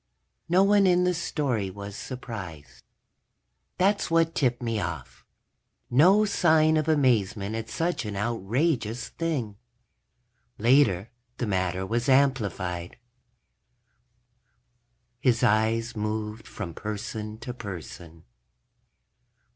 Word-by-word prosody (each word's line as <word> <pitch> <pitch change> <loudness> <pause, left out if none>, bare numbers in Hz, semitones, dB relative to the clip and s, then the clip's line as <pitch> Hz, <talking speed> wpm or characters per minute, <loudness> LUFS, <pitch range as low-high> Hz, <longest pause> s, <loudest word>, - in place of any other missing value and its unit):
No 180 +3 +5
one 200 0 +4
in 180 0 +4
the 180 0 +2
story 135 - -1
was 100 +1 -8
surprised. 100 - -8 1.0
That's 200 +2 +2
what 165 0 +2
tipped 125 -6 +1
me 115 -2 -1
off. 85 -7 -6 0.7
No 185 - +5
sign 160 -5 +3
of 155 -1 0
amazement 115 -8 +1
at 115 0 -4
such 165 +9 -1
an 105 -1 -4
outrageous 115 - -1
thing. 135 -12 -3 1.0
Later 115 -4 +3 0.3
the 120 - -2
matter 95 -2 -1
was 120 +5 -1
amplified. 100 -10 +1
_... - - -16 2.2
his 120 -3 +2
eyes 115 +2 +2
moved 105 +1 -4
from 90 -6 -6
person 105 +2 -5
to 120 +2 -7
person. 85 -6 -9
115 Hz, 105 wpm, -26 LUFS, 100-150 Hz, 2.2 s, No